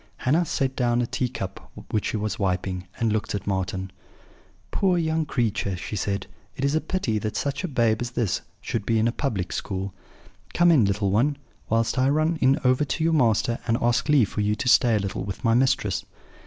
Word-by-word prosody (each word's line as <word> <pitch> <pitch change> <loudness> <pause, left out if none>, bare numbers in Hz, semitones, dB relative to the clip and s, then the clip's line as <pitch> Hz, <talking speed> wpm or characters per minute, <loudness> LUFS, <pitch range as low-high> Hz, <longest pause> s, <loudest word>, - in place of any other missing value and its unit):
"Hannah 160 +7 +2
set 135 -3 -1
down 120 -1 +1
a 120 - +1
tea 125 +1 -2
cup 95 -5 -7 0.2
which 105 - 0
she - - -1
was 105 -1 -3
wiping, 90 -1 -1
and 115 -2 +1
looking 105 -1 -1
at - - -21
Marten: 95 -1 -2 0.8
"'Poor 185 -3 +2
young 160 -2 0
creature!' 110 -7 -1
she 95 - -5
said. 100 0 -2 0.3
'It 135 - -1
is 140 - +1
a 155 - +2
pity 130 - -1
that 110 +1 -4
such 140 +3 -2
a - - 0
babe 115 -6 +1
as 120 - -2
this 120 -6 -1 0.2
should 115 - -3
be 115 +2 +1
in 110 +1 +3
a - - +2
public 100 -10 -2
school. 95 0 -3 0.6
Come 175 0 +5
in, 135 -10 +5
little 100 0 0
one, 135 +8 +2 0.3
whilst 115 +3 +1
I 130 +1 +3
run 155 +3 +1 0.2
over 130 +2 +3
to 145 +3 -2
your 165 0 +2
master 120 -4 +2
and 115 0 +2
ask 120 +5 +1
leave 135 -9 +4
for 105 - -2
you 105 +1 +1
to 110 - -4
stay 120 -1 +5
a - - +2
little 100 -1 -3
with 100 +5 -6
my 115 -2 +3
mistress.' 130 +2 +2
115 Hz, 210 wpm, -25 LUFS, 100-135 Hz, 0.8 s, Come